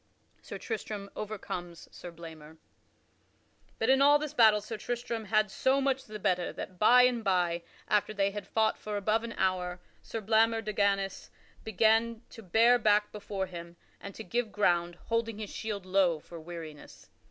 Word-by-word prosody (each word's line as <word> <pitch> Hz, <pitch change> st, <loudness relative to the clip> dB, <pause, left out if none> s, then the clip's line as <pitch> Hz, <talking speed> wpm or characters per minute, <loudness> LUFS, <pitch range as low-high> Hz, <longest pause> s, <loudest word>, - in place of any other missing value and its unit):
[Sidenote: -, -, -26 dB
Sir -, -, -6 dB
Tristram 210 Hz, -, -4 dB
overcomes 180 Hz, -5 st, -6 dB
Sir 175 Hz, -, -9 dB
Blamor] 160 Hz, -2 st, -12 dB, 1.2 s
But 225 Hz, +3 st, +2 dB
in 270 Hz, +1 st, +4 dB
all 290 Hz, +1 st, +7 dB
this 300 Hz, -1 st, -5 dB
battle 220 Hz, -3 st, +6 dB
Sir 215 Hz, +2 st, -6 dB
Tristram 230 Hz, 0 st, -4 dB
had 215 Hz, -1 st, +2 dB
so 265 Hz, +6 st, +2 dB
much 270 Hz, -1 st, 0 dB
the 215 Hz, 0 st, -7 dB
better 185 Hz, -3 st, 0 dB
that, 185 Hz, -1 st, -8 dB
by 250 Hz, +3 st, +7 dB
and 245 Hz, -2 st, +2 dB
by 175 Hz, -3 st, +1 dB, 0.3 s
after 210 Hz, 0 st, +1 dB
they 200 Hz, -1 st, 0 dB
had 205 Hz, 0 st, -7 dB
fought 220 Hz, -1 st, +1 dB
for 210 Hz, -1 st, -4 dB
above 215 Hz, +3 st, +1 dB
an 230 Hz, 0 st, -5 dB
hour, 180 Hz, -1 st, -1 dB, 0.2 s
Sir 225 Hz, -, -5 dB
Blamor 225 Hz, +1 st, +2 dB
de 215 Hz, 0 st, -4 dB
Ganys 195 Hz, -1 st, 0 dB, 0.3 s
began 225 Hz, +2 st, +2 dB
to 225 Hz, -, -11 dB
bare 230 Hz, +5 st, +4 dB
back 210 Hz, -1 st, +3 dB
before 200 Hz, -2 st, -4 dB
him, 170 Hz, -2 st, -9 dB, 0.2 s
and 200 Hz, -, -9 dB
to 220 Hz, -, -7 dB
give 235 Hz, -1 st, -2 dB
ground, 175 Hz, -4 st, +1 dB
holding 230 Hz, -1 st, -1 dB
his 215 Hz, -2 st, -6 dB
shield 205 Hz, -3 st, -5 dB
low 185 Hz, -4 st, +2 dB
for 170 Hz, +2 st, -11 dB
weariness. 160 Hz, -2 st, -10 dB
210 Hz, 175 wpm, -30 LUFS, 185-225 Hz, 1.2 s, all